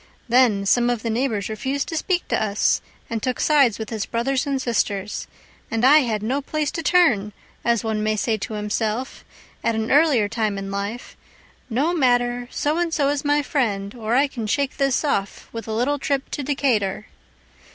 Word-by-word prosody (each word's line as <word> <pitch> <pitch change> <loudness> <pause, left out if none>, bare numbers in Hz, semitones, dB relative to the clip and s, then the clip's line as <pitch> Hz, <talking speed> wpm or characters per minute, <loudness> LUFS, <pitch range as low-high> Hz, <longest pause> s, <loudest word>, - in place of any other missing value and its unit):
Then 235 -5 +3
some 240 +4 +3
of 240 -3 -1
the 230 - -1
neighbors 225 -4 -1
refused 265 +6 -2
to 325 - -4
speak 355 +3 -1
to - - +1
us, 205 -1 +1 0.3
And 225 -1 -3
took 255 +1 -2
sides 280 -8 +4
with 220 0 -6
his 220 -3 -3
brothers 260 +4 -1
and 275 -1 0
sisters. 210 -5 -2 0.4
And 225 +1 +1
I 295 +4 +8
had 220 -6 -1
no 260 +6 0
place 300 0 -2
to 330 - -4
turn, 265 - +3 0.3
as 235 -1 +1
one 220 -1 -1
may 215 0 +1
say 220 +1 0
to 215 +1 -5
himself, 215 +4 -2 0.4
At 230 - +1
an 220 0 -2
earlier 280 -7 +4
time 215 -1 -1
in 195 0 -5
life; 200 +5 -5 0.5
"No 280 +9 +1
matter, 245 -4 +1
So 300 +3 0
and 345 -1 0
so 285 -3 +1
is 290 -1 -1
my 290 0 +2
friend, 205 -9 -1
or 230 -1 -2
I 275 +3 +5
can 240 -6 -5
shake 280 +4 -1
this 275 -1 +1
off 200 -9 -2
With 230 -2 -7
a - - -4
little 255 +6 0
trip 275 0 -2
to - - -3
Decatur." 260 -8 0
240 Hz, 195 wpm, -22 LUFS, 215-280 Hz, 0.5 s, I